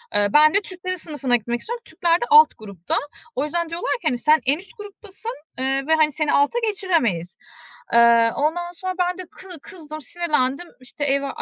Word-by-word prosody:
Iıı, 205 0 +1
ben 305 +1 +6
de 400 - +3
Türklerin 370 -1 -6
sınıfına 295 -7 -1
gitmek 240 +1 -2
istiyorum. 475 - -6
Türkler 340 +2 0
de - - 0
alt 455 +1 +8
grupta. 200 -6 -5 0.4
O 265 - 0
yüzden 340 +2 -2
diyorlar 345 +9 -3
ki, - - -2
hani, 250 -5 +1
"Sen 305 +4 +3
en 275 +3 +2
üst 390 +6 -16
gruptasın, 415 +1 -9 0.3
ııı, 270 +1 -1
ve 320 - +4
hani 310 -1 +3
seni 300 +1 -1
alta 290 +12 +2
geçiremeyiz." 320 - -1 0.6
Eee, 235 -1 +5
ondan 345 +4 -1
sonra 370 +1 -5
ben 360 0 0
de - - -5
kı 380 - -15
kızdım, 310 -5 -10
sinirlendim. 305 0 -1
İşte, 255 +3 -6
eve 280 0 +1
310 Hz, 190 wpm, -22 LUFS, 260-360 Hz, 0.6 s, alt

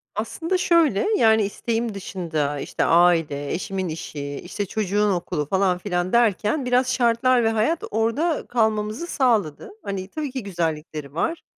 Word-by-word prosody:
Aslında 325 - -2
şöyle 335 - +3
yani 220 -1 +4
isteğim 225 +3 -2
dışında 160 -7 -3
işte - - -2
aile 165 -4 +3
eşimin 190 0 -3
işi 150 -2 -6 0.2
işte 205 +3 -4
çocuğun 210 0 0
okulu 175 -4 -2
falan 190 -2 +2
filan 180 -1 -2
derken 235 +3 +2
biraz 250 0 +2
şartlar 245 0 +3
ve 225 - +3
hayat 225 +10 0
orada 230 +10 0
kalmamızı 220 +4 0
sağladı. 220 - 0
Hani 195 -2 -4
tabii 295 +6 -5
ki 260 -2 -5
güzellikleri 155 -6 -4
var. 325 - -2
210 Hz, 140 wpm, -23 LUFS, 175-240 Hz, 0.2 s, yani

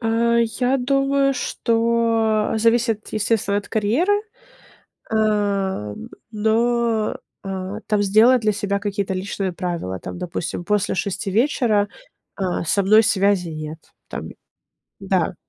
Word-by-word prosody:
А, 235 0 +2
я 245 +3 +1
думаю, 275 +1 +1
что 230 -3 +1
зависит, 230 -1 +1
естественно, 215 -2 0
от 205 - -8
карьеры, 235 - +1 1.0
а, 200 - 0 0.4
но, 225 +1 +1 0.3
а, 195 +2 -5
там 210 -1 +1
сделать 220 +5 +5
для 215 -1 +2
себя 200 -1 -1
какие-то 200 -1 -2
личные 190 0 -3
правила. 170 - -4
Там, 90 0 -7
допустим, 175 0 -4
после 210 0 0
6 195 +1 -2
вечера, 220 -2 +2 0.5
а, 185 -3 -2
со 200 +5 +2
мной 215 +3 +6
связи 200 -4 +2
нет. 155 0 -6 0.3
Там - - -6 0.7
Да. - - 0
210 Hz, 115 wpm, -21 LUFS, 195-230 Hz, 1.0 s, мной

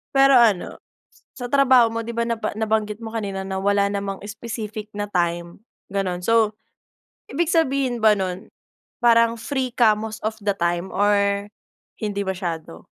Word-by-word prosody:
Pero 270 -1 +7
ano, 215 -6 +2 0.6
sa 245 -2 -6
trabaho 260 -4 +5
mo, 230 - -3
'di 235 +1 -6
ba 235 - +1
naba 230 -2 -3
nabanggit 215 0 -1
mo 225 - -6
kanina 200 -4 -3
na 190 0 -3
wala 200 0 +2
namang 200 -1 -4
specific 215 0 -6
na 205 0 -4
time, 170 -1 -1 0.3
ganun. 185 -3 -2
So, 220 0 +3 0.8
ibig 335 +4 0
sabihin 275 -7 +1
ba 220 - +7
nun 185 0 -4 0.5
parang 230 -1 +5
free 255 +1 -3
ka 220 -4 +4
most 220 0 -6
of 220 0 -3
the 200 - +2
time 175 0 -2
or 200 0 +2 0.5
hindi 205 -2 -2
masyado? 175 - -5
215 Hz, 150 wpm, -22 LUFS, 195-230 Hz, 0.8 s, Pero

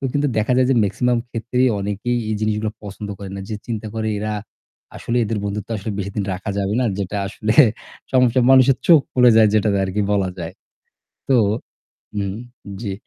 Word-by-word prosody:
তো - - -7
কিন্তু 145 0 +1
দেখা 110 +4 +1
যায় 130 - +4
যে - - +4
মেক্সিমাম 120 +4 +1
ক্ষেত্রেই 125 +2 0
অনেকেই 105 +5 -2
এই 110 - 0
জিনিসগুলো 110 0 -1
পছন্দ 105 0 -7
করে 100 -2 -8
না। 100 - -5
যে 110 - -3
চিন্তা 110 -2 -4
করে, 110 -1 -2
"এরা 105 0 -2 0.6
আসলে 120 - -3
এদের 110 0 -2
বন্ধুত্ব 100 +1 -4
আসলে 105 +1 -5
বেশিদিন 100 +1 -3
রাখা 95 +3 -5
যাবে 100 +1 -1
না।" 125 - +1
যেটা 100 +1 -3
আসলে 105 +2 -2 0.6
সমস্যা 125 -1 +4
মানুষের 130 0 +6
চোখ 165 -4 +8
পুড়ে 125 -1 +6
যায় 110 -1 +6
যেটাতে 105 -2 +2
আরকি 95 +2 -1
বলা 100 -2 +1
যায়। 85 0 -5 0.8
তো 130 - +5 0.8
হুম, 100 -2 -2 0.5
জি। 100 -4 -3
110 Hz, 180 wpm, -20 LUFS, 100-120 Hz, 0.8 s, চোখ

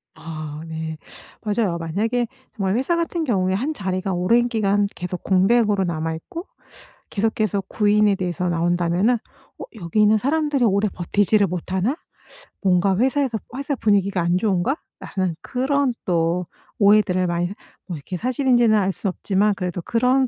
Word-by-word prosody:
아 155 -1 -7
네 160 0 -5 0.4
맞아요. 205 -4 0
만약에 220 +9 -1 0.3
정말 195 -3 0
회사 265 +8 +1
같은 335 0 -1
경우에 190 -9 +1
1 260 +11 -1
자리가 190 -4 -2
오랜 230 +7 +3
기간 205 -3 +1
계속 180 0 -5
공백으로 200 +1 +3
남아 160 -1 -2
있고 330 - -8 0.6
계속해서 215 -1 0
구인에 210 -1 +3
대해서 180 -1 -2
나온다면은 175 +6 +2 0.4
어 - - -6
'여기 185 0 0
있는 210 +1 +5
사람들이 290 +2 +1
오래 200 0 +2
버티지를 200 +3 +2
못하나?' 185 - -1 0.7
뭔가 190 0 +3
회사에서 260 -1 +1 0.2
'회사 280 +1 -2
분위기가 200 -5 +2
안 175 +1 +2
좋은가?'라는 190 - -2
그런 265 +1 0
또 170 0 +1 0.3
오해들을 200 -3 +4
많이 175 0 0 0.4
뭐 175 -4 -4
이렇게 165 +5 -6
사실인지는 240 -1 +3
알 195 -2 +2
수 200 - -4
없지만 200 +2 +1
그래도 180 -2 -3
그런 250 +7 +2
200 Hz, 335 characters per minute, -22 LUFS, 180-235 Hz, 0.7 s, 있는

